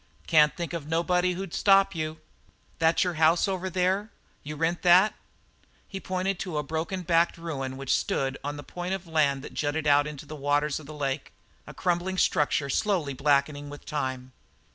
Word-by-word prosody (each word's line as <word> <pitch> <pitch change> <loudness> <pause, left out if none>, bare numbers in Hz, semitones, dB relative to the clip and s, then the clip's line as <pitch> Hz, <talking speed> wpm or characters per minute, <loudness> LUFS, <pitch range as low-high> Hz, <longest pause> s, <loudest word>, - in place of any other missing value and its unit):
"Can't 150 -2 +4
think 170 -1 -4
of 160 -4 -5
nobody 180 +2 +1
who'd 190 -1 -6
stop 195 -1 +4
you." 155 -1 -4 0.6
"That 165 0 +3
your 180 -1 -1
house 165 +5 +4
over 190 -1 -2
there? 190 +4 0 0.3
You 150 +1 -7
rent 165 +3 -1
that?" 180 +4 +6 0.7
He 195 - -6
pointed 185 0 -2
to 180 -5 -4
a 150 - 0
broken 160 +5 -3
backed 170 0 +2
ruin 135 -6 -5
which 135 -1 0
stood 135 0 -1
on 145 +1 -4
the 145 - -8
point 180 +4 -4
of 190 -1 -8
land 145 -5 +1
that - - -9
jutted 155 +1 -2
out 145 0 +4
onto 150 -1 -8
the 155 - -8
waters 145 +1 0
of 150 - -13
the 155 - -9
lake, 140 -1 -3 0.3
a - - -9
crumbling 180 +1 -1
structure 150 -4 +2
slowly 175 -2 0
blackening 145 +1 +1
with 145 0 -11
time. 130 -4 -3
160 Hz, 185 wpm, -27 LUFS, 145-180 Hz, 0.7 s, that